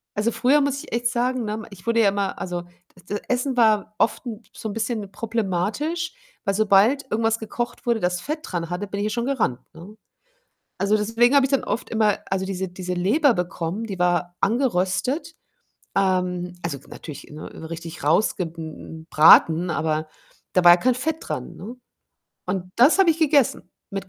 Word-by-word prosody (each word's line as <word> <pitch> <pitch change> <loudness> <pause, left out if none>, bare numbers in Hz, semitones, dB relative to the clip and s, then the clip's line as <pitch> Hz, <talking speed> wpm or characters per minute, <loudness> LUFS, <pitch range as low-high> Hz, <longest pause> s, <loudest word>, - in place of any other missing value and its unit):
also, 215 +3 +1
früher 280 +6 +3
muss 280 -1 0
ich - - -14
echt 240 0 +1
sagen, 245 +1 0
ne, 215 +1 -4
ich 200 +3 -14
wurde 230 0 +3
ja 200 - +5
immer 200 0 -2
also, 175 -1 -4 0.3
das 180 -1 -21
das 205 +1 -3
Essen 250 +1 0
war 215 -2 +3
oft 230 - +1
'n 225 -1 -6
so 220 - -6
'n - - -5
bisschen 220 -3 -3
problematisch, 225 - -2 0.3
weil 195 - +1
sobald 215 +7 +4
irgendwas 225 +1 +1
gekocht 240 +3 -5
wurde, 235 -2 +2
das 180 -1 -1
Fett 305 +1 -4
dran 170 - -4
hatte, 180 +4 -3
bin 200 +1 -5
ich 205 - -1
ja - - 0
schon 235 +2 -2
gerannt, 240 - 0
ne? 185 +6 -12 0.8
Also, 205 +2 +2
deswegen 230 +5 +2
habe 275 - +6
ich - - -8
dann 275 - +2
oft 215 +4 -3
immer, 215 -2 +2
also, 190 0 -1
diese 190 -1 -3
diese 180 0 -5
Leber 235 - +3
bekommen, 180 +3 -3
die 195 -4 -6
war 175 0 0
angeröstet, 245 - 0 0.6
ähm 180 -2 0
also, 155 -5 -3
natürlich, 150 -3 -9
ne, 155 +1 -9
richtig 165 -2 -7
rausge 175 +4 +2
hm, 165 - -7
hm, 160 0 -9
braten, 165 +2 +6
aber 155 -1 -1 0.5
da 185 - +4
war 175 - +10
ja - - +7
kein 250 +5 +2
Fett 320 +3 -1
dran, - - -6
ne? 230 +5 -8 0.7
Und 185 -1 -3
das 270 +10 +6
habe 370 -4 +6
ich 325 - -1
gegessen 285 - +2 0.2
mit 195 -1 -5
205 Hz, 185 wpm, -23 LUFS, 180-240 Hz, 0.8 s, war